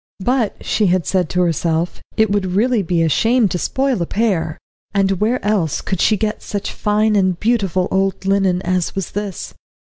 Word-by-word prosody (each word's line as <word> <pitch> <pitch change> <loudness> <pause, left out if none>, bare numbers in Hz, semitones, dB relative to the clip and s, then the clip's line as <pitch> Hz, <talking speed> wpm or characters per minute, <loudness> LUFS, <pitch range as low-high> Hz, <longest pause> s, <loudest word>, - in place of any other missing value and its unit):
But 245 -4 0
she 205 -5 +2
said 180 -3 0
to 180 - 0
herself 165 0 0 0.2
it 220 -2 +3
would 205 -1 +1
really 235 +2 +2
be 170 -2 0
a - - +2
shame 225 - +3
to 180 - -2
spoil 265 -3 0
a 170 - -1
pair, 195 -8 0 0.4
and 195 -1 +2
where 230 +4 +2
else 195 -8 +1
could 190 -2 -3
she 215 - +3
get 210 +1 -2
such 205 -2 -4
fine 210 +1 +1
and 185 -3 +1
beautiful 195 -6 +1
old 195 0 0
linen 195 -2 +1
as 185 -1 -1
was 195 -2 -3
this? 205 -2 -5
195 Hz, 180 wpm, -18 LUFS, 180-215 Hz, 0.4 s, it